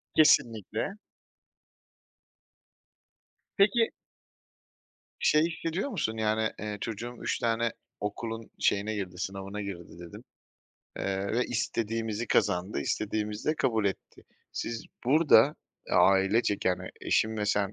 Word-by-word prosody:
Kesinlikle! 115 Hz, -, +3 dB, 2.6 s
Peki 225 Hz, +3 st, +4 dB, 1.3 s
şey 150 Hz, -, +4 dB
hissediyor 170 Hz, -, -3 dB
musun 110 Hz, -, -2 dB
yani, 110 Hz, 0 st, +1 dB
eee, 105 Hz, -1 st, -4 dB
çocuğum 115 Hz, +2 st, -5 dB
3 -, -, -1 dB
tane 115 Hz, 0 st, +1 dB, 0.3 s
okulun 115 Hz, +2 st, -4 dB
şeyine 105 Hz, +2 st, +1 dB
girdi, 90 Hz, -3 st, -5 dB
sınavına 100 Hz, +2 st, -4 dB
girdi 90 Hz, -4 st, -7 dB
dedin, 85 Hz, -1 st, -10 dB, 0.7 s
eee, 95 Hz, 0 st, -1 dB
ve 125 Hz, +2 st, +2 dB
istediğimizi 115 Hz, -1 st, -2 dB
kazandı, 90 Hz, +1 st, +1 dB
istediğimizi 105 Hz, +3 st, -2 dB
de 155 Hz, -, 0 dB
kabul 115 Hz, -7 st, +1 dB
etti. 100 Hz, -1 st, -3 dB, 0.3 s
Siz 115 Hz, -1 st, -4 dB, 0.2 s
burada 150 Hz, +1 st, +6 dB, 0.4 s
ailecek 100 Hz, +2 st, +3 dB
yani 90 Hz, -1 st, 0 dB
eşin 110 Hz, 0 st, +1 dB
ve 105 Hz, -1 st, -1 dB
sen 100 Hz, 0 st, +1 dB
110 Hz, 105 wpm, -29 LUFS, 100-120 Hz, 2.6 s, burada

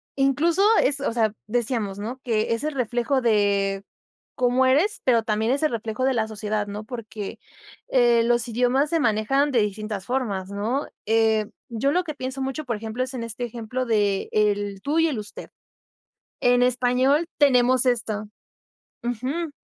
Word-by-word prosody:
incluso 290 Hz, +7 st, +2 dB, 0.2 s
es, 280 Hz, +1 st, +2 dB
o 280 Hz, -, -1 dB
sea, 225 Hz, -2 st, +1 dB
decíamos, 220 Hz, -3 st, -1 dB
¿no?, 230 Hz, +6 st, -5 dB
que 225 Hz, -2 st, 0 dB
es 230 Hz, -, -2 dB
el 305 Hz, -1 st, -2 dB
reflejo 250 Hz, +2 st, 0 dB
de, 200 Hz, -3 st, +1 dB, 0.6 s
cómo 250 Hz, +1 st, +3 dB
eres, 325 Hz, +11 st, +2 dB
pero 235 Hz, -3 st, +3 dB
también 220 Hz, +1 st, 0 dB
es 280 Hz, +3 st, 0 dB
el 305 Hz, -, +2 dB
reflejo 230 Hz, +2 st, -2 dB
de 265 Hz, -, +2 dB
la 220 Hz, -3 st, 0 dB
sociedad, 210 Hz, -1 st, -3 dB
¿no?, 205 Hz, +1 st, -6 dB
porque, 220 Hz, -3 st, -7 dB, 0.5 s
eh, 240 Hz, -2 st, +4 dB
los 240 Hz, 0 st, +1 dB
idiomas 250 Hz, +5 st, +1 dB
se 330 Hz, -, +1 dB
manejan 245 Hz, +4 st, +2 dB
de 240 Hz, -, +3 dB
distintas 210 Hz, -1 st, -4 dB
formas, 210 Hz, -8 st, -2 dB
¿no? 220 Hz, +8 st, -2 dB, 0.2 s
Eh, 220 Hz, -1 st, +2 dB, 0.2 s
yo 240 Hz, +4 st, 0 dB
lo 360 Hz, +4 st, +1 dB
que 315 Hz, -3 st, -5 dB
pienso 260 Hz, 0 st, -5 dB
mucho, 270 Hz, +3 st, -3 dB
por 235 Hz, -, -2 dB
ejemplo, 220 Hz, +3 st, -5 dB
es 255 Hz, +1 st, -2 dB
en 235 Hz, -, -4 dB
este 230 Hz, +2 st, -4 dB
ejemplo 240 Hz, +2 st, -4 dB
de 205 Hz, -3 st, +1 dB
el 205 Hz, -2 st, 0 dB
tú 300 Hz, +3 st, +1 dB
y 330 Hz, -, +4 dB
el 275 Hz, -7 st, -2 dB
usted. 210 Hz, -1 st, -9 dB, 0.9 s
En 245 Hz, 0 st, +4 dB
español 255 Hz, +5 st, +2 dB
tenemos 255 Hz, -3 st, +4 dB
esto, 220 Hz, -4 st, 0 dB, 0.8 s
ujú, 260 Hz, +7 st, -3 dB
240 Hz, 170 wpm, -24 LUFS, 215-260 Hz, 0.9 s, eh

